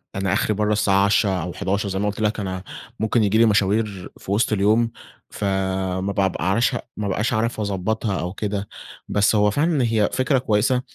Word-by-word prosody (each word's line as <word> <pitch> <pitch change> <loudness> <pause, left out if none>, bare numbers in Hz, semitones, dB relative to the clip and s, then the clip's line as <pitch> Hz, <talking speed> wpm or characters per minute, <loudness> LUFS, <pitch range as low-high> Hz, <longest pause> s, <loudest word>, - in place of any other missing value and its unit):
أنا 95 -1 0
آخري 105 +2 +1
برا 105 +1 0
الساعة 100 -2 +3
22:00 100 +1 +3
أو 90 +1 -5
23:00 100 +1 -2
زي 95 0 -2
ما 105 - 0
قلت 105 0 -3
لَك 110 0 0
أنا 95 -2 -4 0.4
ممكن 110 +1 +1
ييجي 105 +1 +2
لي 115 - +6
مشاوير 100 -2 +1
في - - -7
وسط 110 +2 +2
اليوم، 110 +3 +2 0.4
فما 95 -1 -2
بابقعرش 95 +4 +1
ما - - -3 0.3
بابقاش 110 +5 -1
أعرف 115 +1 -1
أضبطّها 100 0 -1
أو 90 +2 -4
كده. 105 0 -3 0.4
بس 105 +2 +2
هو 105 0 +3
فعلًا 150 +2 +1
هي 110 -3 +2
فكرة 130 +1 +2
كويسة، 125 +2 +1
105 Hz, 180 wpm, -22 LUFS, 95-110 Hz, 0.4 s, لي